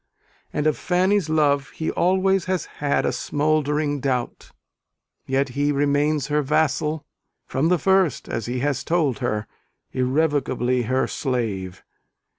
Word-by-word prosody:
And 150 - -2
of 155 -6 +1
Fanny's 185 -1 +1
love 145 -2 +2
he 160 - -2
always 190 +1 +2
has 185 -3 -1 0.2
had 145 -1 +1
a - - +1
smouldering 150 0 0
doubt: 130 -2 -2 0.8
yet 135 +1 +1
he 145 +3 0
remains 145 0 +1
her 150 +1 +1
vassal, 155 +1 0 0.4
from 145 +5 0
the 180 - +4
first, 190 -4 +2
as 115 - -3
he 125 +1 -2
has 145 0 0
told 155 -7 +1
her 110 -4 -1 0.5
irrevocably 130 -2 +1
her 130 +1 +2
slave. 110 - -3
145 Hz, 130 wpm, -23 LUFS, 130-160 Hz, 0.8 s, the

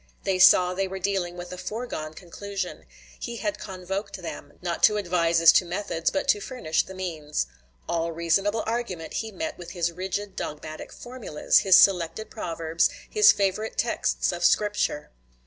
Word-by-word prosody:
They 190 -1 0
saw 180 0 +7
they 195 +1 -1
were 190 +1 -5
dealing 185 -2 -2
with 175 0 -7
a 180 - -8
foregone 185 -6 -5
conclusion; 195 +2 -6 0.3
he 235 - -5
had 310 +6 -3
convoked 190 +2 -5
them, 160 -4 -8
not 175 -1 -3
to 210 -1 +3
advise 170 -4 +1
as 165 0 +9
to - - +4
methods, 175 -2 -2
but 285 - -2
to 205 - +4
furnish 180 -11 -1
the 190 - -10
means. 160 -5 -3 0.4
All 170 0 -1
reasonable 195 +6 +1
argument 220 -8 -3
he 220 -1 -7
met 320 - -5
with 175 - -8
his 170 -2 0
rigid 190 +3 -4
dogmatic 155 +1 -6
formulas, 240 -11 0
his 190 -2 +6
selected 190 +2 +3
proverbs, 165 -4 0 0.2
his 425 0 +7
favorite 205 +2 -1
texts 235 - 0
of 175 -1 -5
Scripture. 205 -5 +1
185 Hz, 165 wpm, -26 LUFS, 170-205 Hz, 0.4 s, as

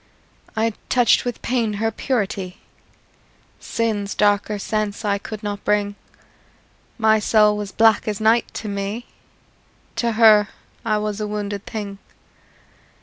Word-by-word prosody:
I 225 0 +1 0.2
touched 245 0 +4
with 245 - -4
pain 235 -4 0
her 225 +2 -1
purity; 200 -6 -2 1.0
Sin's 215 -4 -2
darker 205 0 +2
sense 215 +1 -2
I 200 -1 +1
could 215 +1 -8
not 205 -1 -4
bring: 205 -1 +1 1.0
My 220 -1 +4
soul 210 0 +4
was 205 -1 -4
black 225 +1 +4
as 210 -1 -2
night 225 +2 +3
to 215 - -5
me: 200 +4 -3 0.9
To 235 -1 +1
her 215 -2 +6 0.4
I 215 -2 +1
was 210 0 -3
a 210 - -2
wounded 205 -1 -4
thing. 205 -3 -5
210 Hz, 130 wpm, -21 LUFS, 205-225 Hz, 1.0 s, her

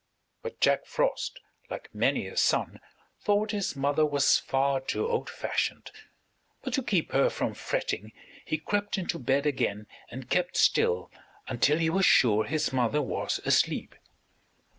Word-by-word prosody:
But 470 0 -7
Jack - - +2
Frost, - - -1 0.3
like - - -8
many - - +1
a - - -8
son, - - +1 0.4
thought 205 +1 +1
his 200 -7 -2
mother 140 +3 +1
was 145 -2 +3
far 135 0 0
too 130 - -2
old 465 -1 -2
fashioned; - - -3 0.7
but 260 - -4
to 270 - +1
keep 190 -9 0
her 135 - +3
from - - -2
fretting 105 +3 -3 0.3
he 155 - -2
crept 205 +6 -2
into 175 -2 -3
bed 135 +2 +1
again 115 -7 -1 0.2
and 125 +1 -8
kept 180 +6 0
still 465 +1 +2 0.4
until 135 +4 +2
he 165 -1 +1
was 190 +2 +3
sure 110 -3 +4
his 155 -1 -1
mother 125 +3 +1
was 130 - -2
asleep. - - +1
150 Hz, 150 wpm, -28 LUFS, 135-205 Hz, 0.7 s, sure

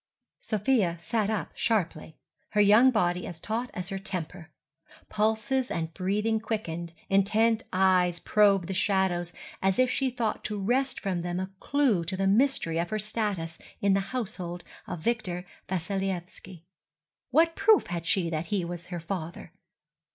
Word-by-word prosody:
Sofia 210 -5 +1
sat 210 +5 -1
up 210 -8 -2
sharply, 175 -8 -1 0.4
her 210 - +2
young 210 +5 +7
body 180 -7 +1
as 165 - -8
taut 230 +7 -3
as 180 0 -4
her 195 - -3
temper. 185 -3 -5 0.6
Pulses 220 +5 0
and 165 -1 -3
breathing 210 +5 0
quickened, 175 -7 -4
intent 220 +3 +3
eyes 185 -2 +3
probed 200 -3 +4
the 190 - -3
shadows 190 -3 +1 0.3
as 190 0 +2
if 255 0 +3
she 270 -1 +1
thought 235 -3 -2
to 210 -1 -2
wrest 255 +6 +1
from 185 -4 -2
them 175 +1 -2
a 190 +1 -4
clue 270 -11 +2
to 190 +3 -3
the 195 - 0
mystery 200 -6 +2
of 170 - -1
her 215 - -1
status 205 -6 -2 0.2
in 200 -1 +3
the 195 - +3
household 185 -8 -4 0.2
of 175 -3 -5
Victor 185 -4 -1 0.2
Vassilyevski. 190 -1 -4 0.7
What 330 +5 +4
proof 405 +1 +5
had 170 -1 -4
she 170 -3 +1
that 160 +1 -2
he 195 -3 0
was 175 0 -6
her 175 -1 -5
father? 165 -1 -6
195 Hz, 155 wpm, -28 LUFS, 175-220 Hz, 0.7 s, young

